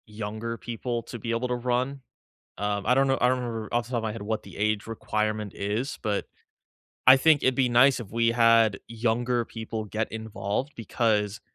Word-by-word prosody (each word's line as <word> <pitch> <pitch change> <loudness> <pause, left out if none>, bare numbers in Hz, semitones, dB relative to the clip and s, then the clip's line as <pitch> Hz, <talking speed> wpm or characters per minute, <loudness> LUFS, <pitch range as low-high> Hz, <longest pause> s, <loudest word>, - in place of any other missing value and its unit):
Younger 110 +2 -5
people 120 0 -4
to 120 - -8
be 115 - -6
able 115 +2 0
to 125 - -1
run, 125 +3 -1 0.6
um, 100 -1 -2
I 125 - +4
don't 135 +1 +3
know, 135 0 +2
I 125 - +4
don't 130 0 +2
remember 115 -3 -4
off 120 0 +1
the - - -13
top 125 - 0
of 115 - -2
my 110 - -1
head 115 - -7
what 110 +1 -3
the - - -12
age 105 0 0
requirement 110 -2 -2
is, 105 +7 -3
but 105 -3 -1 0.9
I 130 - +11
think 150 +2 +4
it'd 130 -1 +2
be 130 -2 +3
nice 125 +3 +5
if 115 -6 -8
we 115 0 +2
had 115 -3 +4
younger 120 +1 0
people 110 -1 -5
get 110 +1 -3
involved 110 +4 -3
because 110 -2 0
115 Hz, 205 wpm, -26 LUFS, 110-125 Hz, 0.9 s, I